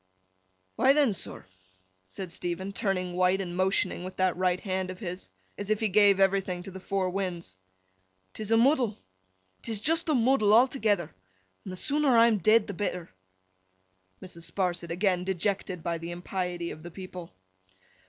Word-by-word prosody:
'Why 260 +3 +5
then, 285 -7 +3
sir,' 190 - -6 0.6
said 185 - -7
Stephen, 180 +3 -4
turning 185 -3 -1
white, 185 +1 +2
and 175 -2 -4
motioning 185 -1 0
with 185 +1 -7
that 185 -1 +1
right 180 0 +1
hand 190 -2 -3
of 185 - -6
his, 180 - -6 0.3
as 205 0 -5
if 215 -1 +1
he 220 - 0
gave 200 0 +5
everything 195 -2 +1
to 195 - -8
the 190 - -8
four 190 -1 -1
winds, 180 - -4 0.8
''tis 215 -1 -5
a 225 - +4
muddle. 245 -3 +3 0.6
'Tis 225 -3 -2
just 325 - +2
a 305 - +3
muddle 230 -4 +4
a'toogether, 220 - +2 0.5
an' - - -8
the 185 - -5
sooner 280 +4 +2
I 230 - +7
am 225 -3 +3
dead, 215 +4 +4
the 200 - -6
better.' 180 -3 -4 1.1
(Mrs. 170 -2 -7
Sparsit 175 -3 -1
again 180 +1 0
dejected 190 -1 -2
by 170 -1 -2
the 165 +1 -7
impiety 175 0 -4
of 155 - -9
the 175 - -8
people.) 180 - -9
190 Hz, 165 wpm, -28 LUFS, 180-215 Hz, 1.1 s, I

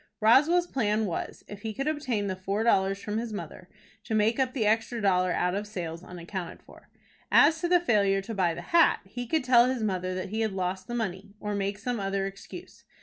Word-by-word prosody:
Roswell's 295 +11 +5
plan 220 -8 0
was, 175 - -5
if 205 -1 -9
he 220 -1 -5
could 275 +3 -3
obtain 265 -9 -1
the 190 -1 -2
four 195 +3 -2
dollars 195 -4 +2
from 210 +1 -3
his 230 -1 -4
mother, 210 - -8 0.3
to 220 - -2
make 215 +4 +2
up 260 -1 +1
the 225 -5 0
extra 225 +2 +1
dollar 185 -3 +2
out 180 0 0
of 205 +2 -3
sales 170 -4 -6
unaccounted 180 0 -7
for. - - -18 0.4
As 315 +2 +5
to 345 - +1
the 355 0 +5
failure 200 - +2
to 225 - -6
buy 180 -5 +1
the 170 - -7
hat, 340 0 +4
he 245 +5 -6
could 315 +3 0
tell 250 -1 +5
his 255 -3 -1
mother 185 -3 -1
that 185 +1 -4
he 220 +3 -2
had 220 -3 0
lost 185 0 -3
the 240 - -4
money, 200 -2 -4
or 210 0 -3
make 200 0 -2
some 235 +3 -3
other 195 0 -1
excuse. 195 - -10
210 Hz, 220 wpm, -28 LUFS, 190-240 Hz, 0.4 s, Roswell's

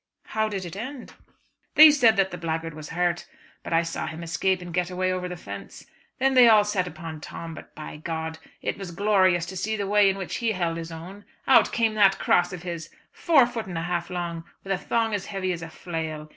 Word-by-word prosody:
"How 220 0 0
did 195 -3 -4
it 170 - -7
end?" 255 +5 -7 0.6
"They 310 0 +10
said 240 -7 +4
that 190 -1 +2
the 175 - -5
blackguard 165 -1 -3
was 155 0 -9
hurt, 175 0 -1 0.4
but - - -7
I 165 0 +3
saw 165 - -4
him 160 +2 -6
escape 170 +3 0
and 175 -1 -9
get 180 0 0
away 185 0 0
over 180 0 -3
the 180 - -6
fence. 100 - -9 0.3
Then 270 +1 +2
they 250 -2 +8
all 215 -2 +7
set 200 -3 -1
upon 160 -2 -8
Tom, 165 +1 -7
but - - -12
by 155 -1 -8
G 160 -1 -4 0.2
it - - -2
was 195 -2 -6
glorious 185 -2 +2
to 185 +2 -8
see 215 +4 -1
the 200 - -2
way 205 0 +4
in 195 - -1
which 190 -2 -4
he 230 -2 0
held 170 -3 -1
his 165 0 -6
own. 180 +5 -9 0.2
Out 270 - +5
came 225 -2 +1
that 200 -2 +4
cross 175 0 +2
of 180 -2 -7
his, 170 -2 -5 0.2
four 305 -7 +4
foot 235 -4 -5
and 175 -3 -5
a 165 - -2
half 170 0 -2
long, 170 -2 -4 0.2
with 195 - -1
a - - 0
thong 225 -2 0
as 200 -2 -2
heavy 190 -2 -2
as 170 - -6
a 165 - -7
flail. 160 -3 -5
180 Hz, 235 wpm, -25 LUFS, 165-205 Hz, 0.6 s, They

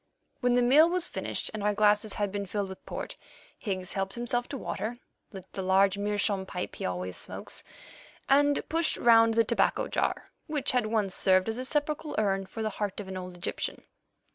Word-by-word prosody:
When 245 -2 +2
the 245 0 +4
meal 295 +7 +6
was 360 0 +2
finished - - -3
and 215 - -4
our 205 0 +1
glasses 210 0 +3
had 205 -2 -1
been 200 0 -3
filled 200 0 -2
with 190 - -10
port, - - -5 0.4
Higgs 185 -4 -4
helped 195 0 -2
himself 240 0 -1
to 280 - -5
water, 230 -2 -3 0.4
lit 190 -4 -9
the 190 - -4
large 190 +1 +4
meerschaum 200 -1 0
pipe 180 - -5
he - - -4
always 90 0 -4
smokes, - - -5 0.6
and 285 +1 +3
pushed 325 0 +1
round 230 -1 +6
the 230 - +5
tobacco 230 +2 +1
jar - - -1 0.2
which 300 -3 0
had 250 -4 +1
once 215 -4 0
served 185 0 +3
as 225 +2 -2
a 255 - -2
sepulchral 300 +2 -1
urn 195 -2 +1
for 225 - -5
the 215 - -1
heart 205 -1 -1
of 205 - -6
an 190 - -5
old 180 -1 -7
Egyptian. 175 - -3
210 Hz, 195 wpm, -29 LUFS, 195-245 Hz, 0.6 s, meal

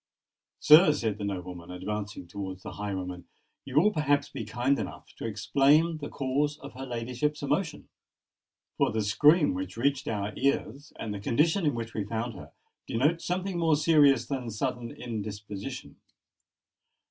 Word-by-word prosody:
"Sir," 155 +1 +8
said 110 -6 -2
the - - -4
nobleman, 90 -3 -5
advancing 100 +2 -5
towards 95 0 -6
the - - -6
highwayman, 95 -3 -5 0.4
"you 140 +2 +2
will 210 +6 +4
perhaps 145 -2 +1
be - - -5
kind 125 +6 0
enough - - -7
to - - -4
explain 145 +9 +3
the 145 - -6
cause 145 +2 -1
of 140 -1 -10
her 135 +1 -7
ladyship's 125 +5 -2
emotion?—for 150 +2 -4
the 110 -1 0
scream 150 - +4
which 95 +2 -5
reached 140 +3 0
our 105 -1 -2
ears, 140 0 -1
and 110 - -4
the 100 - -5
condition 155 - +2
in 145 - +1
which 115 -1 -5
we 105 - -2
found 115 +3 -3
her, 95 - -11 0.4
denote 150 +9 +1
something 180 0 -2
more 165 -2 +4
serious 145 -5 +4
than 130 -4 -3
sudden 120 +1 -3
indisposition. 105 +1 -6
125 Hz, 150 wpm, -28 LUFS, 105-150 Hz, 0.4 s, Sir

